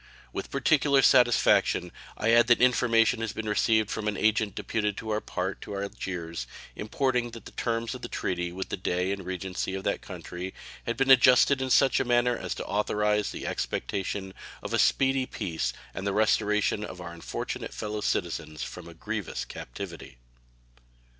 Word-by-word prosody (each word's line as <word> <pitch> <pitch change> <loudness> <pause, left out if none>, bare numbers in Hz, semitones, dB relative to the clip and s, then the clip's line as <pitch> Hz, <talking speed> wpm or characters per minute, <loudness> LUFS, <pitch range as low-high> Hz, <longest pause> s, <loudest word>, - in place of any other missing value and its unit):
With - - -4
peculiar 140 -3 +3
satisfaction 120 -8 +4 0.3
I 110 +2 +2
add 120 0 +6
that 120 - +5
information 115 -2 +3
has 115 -2 -2
been 110 0 -5
received 110 0 +2
from 110 -1 -3
an 105 - -1
agent 110 -2 +1
deputed 105 -2 -2
on 110 - -7
our 105 0 0
part 95 +1 -3
to 100 - -6
Algiers 90 -4 -5 0.3
importing 125 +2 0
that 115 -1 -11
the - - -10
terms 115 -1 -2
of - - -8
the - - -5
treaty 90 -1 -2
with 95 +2 -5
the - - -3
Dey 90 0 -1
and 100 -1 -3
Regency 95 +1 -3
of 95 - -5
that - - -1
country 90 +2 -7 0.3
had 115 0 -1
been 135 +1 +3
adjusted 130 +1 +6
in 130 - -1
such 130 +1 +4
a - - +2
manner 120 -1 +2
as 95 -5 -4
to - - -5
authorize 105 0 +1
the - - -6
expectation 95 0 -3 0.3
of - - -5
a - - +2
speedy 135 -1 +3
peace 80 - -2 0.2
and 95 - -4
the 100 - 0
restoration 105 0 +2
of 90 -3 -7
our 85 -1 -7
unfortunate 85 - -5
fellow 105 0 -4
citizens 75 -5 -2
from - - -8
a - - -12
grievous - - -4
captivity. 70 -2 -8
105 Hz, 175 wpm, -28 LUFS, 95-120 Hz, 0.3 s, add